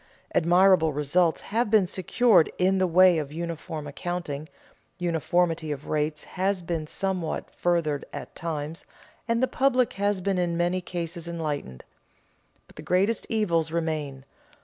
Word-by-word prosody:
Admirable 175 -1 +4
results 150 +4 +1
have 225 +1 -1
been 210 -3 +5
secured 190 +1 +3
in 190 +1 +2
the 185 - +3
way 180 0 +5
of 145 -2 -5
uniform 160 -1 -5
accounting, 155 0 -5 0.5
uniformity 170 -2 0
of 145 -1 -6
rates 150 0 -1
has 190 0 -2
been 165 -2 -3
somewhat 185 -2 -3
furthered 165 -5 0
at - - -8
times, 160 -1 -5 0.4
and 230 +1 +1
the - - +4
public 255 -1 +2
has 200 0 0
been 190 0 0
in 170 -1 0
many 175 +2 +1
cases 170 -1 -5
enlightened. 150 - -4 0.8
But - - -22
the - - -7
greatest 195 +5 +1
evils 170 -8 +1
remain. 155 -5 -3
170 Hz, 140 wpm, -26 LUFS, 155-185 Hz, 0.8 s, been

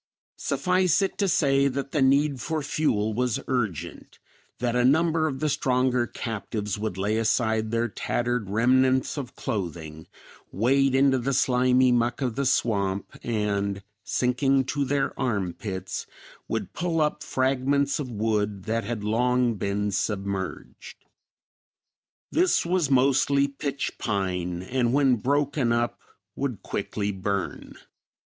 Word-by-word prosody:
Suffice 180 +6 +2
it 195 - -3
to 200 - +2
say 140 -5 +3
that 140 0 -3
the 150 - 0
need 140 0 +3
for 160 -2 -2
fuel 125 -8 0
was 125 0 0
urgent, 110 - -3 0.4
that 120 0 -1
a 125 - +3
number 160 +4 +3
of 135 -2 -4
the 155 - +1
stronger 125 -3 +1
captives 105 -3 -4
would 105 -3 -3
lay 105 +3 0
aside 110 -1 +1
their 115 +1 0
tattered 120 0 -2
remnants 130 +4 +2
of 140 -5 -6
clothing, 85 - -5 0.4
wade 135 +6 +2
into 135 -1 +4
the 135 +3 -1
slimy 125 0 +3
muck 120 0 +1
of 125 -5 -2
the 140 -1 0
swamp, 100 -5 0
and, 100 -3 -1 0.2
sinking 135 +2 +1
to 140 +1 -1
their 135 0 0
armpits, 95 -5 -3 0.4
would - - -3
pull 170 -1 -1
up 150 -1 0
fragments 135 +2 +1
of 140 -4 -4
wood 105 -3 -1
that 115 +2 -1
had 115 -3 -4
long 125 +3 +2
been 100 0 -2
submerged. 100 -1 -4 1.3
This 350 - +2
was 175 -4 +1
mostly 140 +1 +3
pitch 140 0 -4
pine 90 -4 -2
and 120 +3 0
when 135 -3 +4
broken 140 +1 +1
up 120 0 0 0.4
would 130 -7 -3
quickly 105 -1 -3
burn. 100 0 -4
125 Hz, 130 wpm, -26 LUFS, 105-140 Hz, 1.3 s, into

